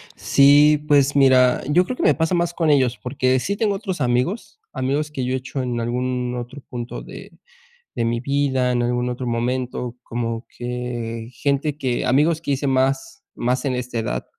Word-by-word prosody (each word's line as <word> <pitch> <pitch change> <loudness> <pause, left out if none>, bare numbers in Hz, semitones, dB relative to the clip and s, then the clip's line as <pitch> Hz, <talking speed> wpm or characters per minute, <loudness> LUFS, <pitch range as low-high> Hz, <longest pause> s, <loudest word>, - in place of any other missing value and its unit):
Sí, 145 +2 +5
pues 145 -1 +4
mira, 130 -2 +5
yo 155 +6 +3
creo 255 - -5
que - - -2
me - - +5
pasa 165 +2 0
más 170 0 0
con 165 -2 0
ellos, 130 -5 +3
porque 130 +1 +1
sí 200 +10 -2
tengo 210 -2 +1
otros 190 -4 -4
amigos, 125 - -1
amigos 140 +4 -1
que 130 -4 -3
yo 130 - -1
he 130 - +1
hecho 130 +1 -5
en 120 -2 -2
algún 125 +1 -2
otro 125 +3 -7
punto 120 -1 -6
de - - -11 0.6
de 115 - -1
mi 115 0 0
vida, 135 -1 0
en 120 -1 +1
algún 120 0 0
otro 125 +1 -4
momento, 125 +1 -2
como 115 0 -4
que 120 -1 -5
gente 140 +3 -1
que 130 -4 -2
amigos 150 +5 +3
que 145 - -2
hice 140 +1 -1
más 135 - 0
más 125 +3 -1
en 130 -3 0
esta 125 -1 -4
edad, 60 - -2
130 Hz, 190 wpm, -21 LUFS, 125-145 Hz, 0.6 s, Sí